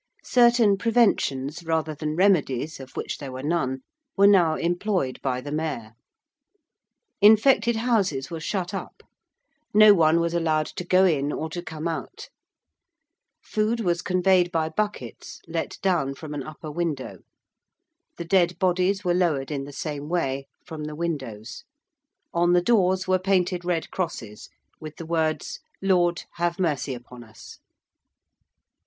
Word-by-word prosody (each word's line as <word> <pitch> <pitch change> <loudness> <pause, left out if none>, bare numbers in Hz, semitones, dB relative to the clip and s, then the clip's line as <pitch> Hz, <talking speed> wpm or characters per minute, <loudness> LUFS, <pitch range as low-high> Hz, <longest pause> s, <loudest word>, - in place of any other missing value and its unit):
Certain 235 -4 +4
preventions, 175 - +1
rather 160 -1 -1
than 155 +1 -4
remedies, 160 -6 +1
of 130 -1 -12
which - - -4
there 140 -2 -7
were 130 +1 -7
none, 135 -5 -1 0.4
were 200 - +6
now 180 -6 +5
employed 175 -5 -1
by 125 -2 -1
the 145 +3 -7
Mayor. 150 -8 -3 1.3
Infected 220 +2 +5
houses 200 - 0
were 165 - -4
shut 185 +3 -3
up: 195 - -7 0.7
no 215 0 +9
one 165 -2 +4
was 170 0 -1
allowed 160 -2 +1
to 180 - -6
go 185 +2 +4
in 145 -5 +1
or 160 +1 -4
to 175 - -4
come 160 -2 -5
out: 165 -1 -6 1.1
food 215 +2 -1
was 175 -5 0
conveyed 185 -1 +2
by 160 -1 0
buckets 160 - -4
let 165 0 -4
down 165 -8 +1
from 150 +1 -8
an 145 - -4
upper 155 +2 -8
window: 155 -4 -3 1.0
the 170 - -5
dead 175 -1 +2
bodies 185 +2 +1
were 175 -2 +1
lowered 160 -6 0
in 140 -2 -3
the 145 - -9
same 145 0 -5
way, 135 -6 -1 0.2
from 160 -3 -7
the 150 0 -6
windows: 135 -10 -5 0.7
on 175 +1 +3
the 175 0 +3
doors 190 -4 +2
were 185 0 +3
painted 185 -1 0
red 175 -2 -2
crosses 115 - -5 0.3
with 155 -1 -9
the 165 - -8
words, 160 -1 -1 0.2
'Lord, 180 -3 +2
have 175 0 0
mercy 150 -6 -1
upon 120 0 -12
us!' 110 -1 -14
170 Hz, 145 wpm, -25 LUFS, 150-185 Hz, 1.3 s, no